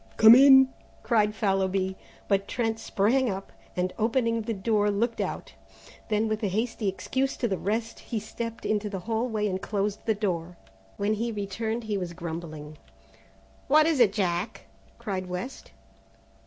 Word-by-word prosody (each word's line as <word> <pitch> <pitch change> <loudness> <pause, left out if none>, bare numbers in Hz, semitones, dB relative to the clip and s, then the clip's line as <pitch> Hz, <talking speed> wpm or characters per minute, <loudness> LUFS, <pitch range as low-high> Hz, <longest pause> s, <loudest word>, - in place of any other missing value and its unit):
"Come 220 +1 +10
in!" 265 0 +8 0.3
cried 210 -3 +2
Fallowby, 190 -2 0 0.3
but 195 -1 +1
Trent 225 -2 -1
sprang 235 +7 +1
up, 195 0 -5 0.2
and 180 0 -1
opening 230 0 +1
the 225 +1 -3
door, 205 +1 +1
looked 225 +3 0
out. - - -4 0.6
Then 215 +1 +1
with 215 0 -2
a 210 - +1
hasty 220 +2 -2
excuse 260 +8 -1
to 240 - 0
the 190 -4 -2
rest, 225 +3 -2
he 225 - -4
stepped 230 +2 -6
into 210 -1 0
the 190 -2 -5
hall 225 +4 -1
way 215 -2 0
and 190 -1 -2
closed 205 +1 -2
the 220 - +3
door. 180 -4 -3 0.4
When 205 +1 +1
he 230 +2 -2
returned 220 +3 -3
he 210 -2 -2
was 175 -2 -5
grumbling. 160 -3 -7 0.9
"What 305 +2 +6
is 320 -4 +2
it, 230 -5 +6
Jack?" 190 +1 -2 0.3
cried 185 -3 -4
West. 180 +9 -6
210 Hz, 160 wpm, -27 LUFS, 190-230 Hz, 0.9 s, Come